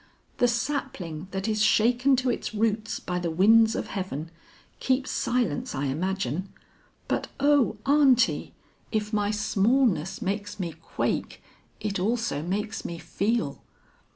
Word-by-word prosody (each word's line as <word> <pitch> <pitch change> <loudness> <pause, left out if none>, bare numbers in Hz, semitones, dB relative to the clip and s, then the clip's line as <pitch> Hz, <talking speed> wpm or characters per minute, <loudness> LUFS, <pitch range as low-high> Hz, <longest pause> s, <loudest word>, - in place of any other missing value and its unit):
The 245 - +4
sapling 235 - -3
that 195 +2 -3
is 215 -1 0
shaken 245 +5 +4
to 255 -1 +1
its 225 - -4
root 215 0 0
by 180 0 -1
the 175 -1 -2
winds 220 +7 +5
of - - -2
heaven, 165 -5 -4 0.5
keeps 260 0 0
silence 235 -14 -1
I 140 +1 -1
imagine. 180 +3 -2 0.6
But - - -1
O 285 -2 +3
Aunty, 275 -3 +3 0.4
if 215 -1 -2
my 205 -1 +1
smallness 210 - +1
makes 205 +2 -3
me 170 -3 -3
quake, - - -3 0.4
it 205 -3 -2
also 225 -6 0
makes 205 +6 -3
me 170 - -5
feel. 195 - -1
210 Hz, 130 wpm, -26 LUFS, 180-240 Hz, 0.6 s, winds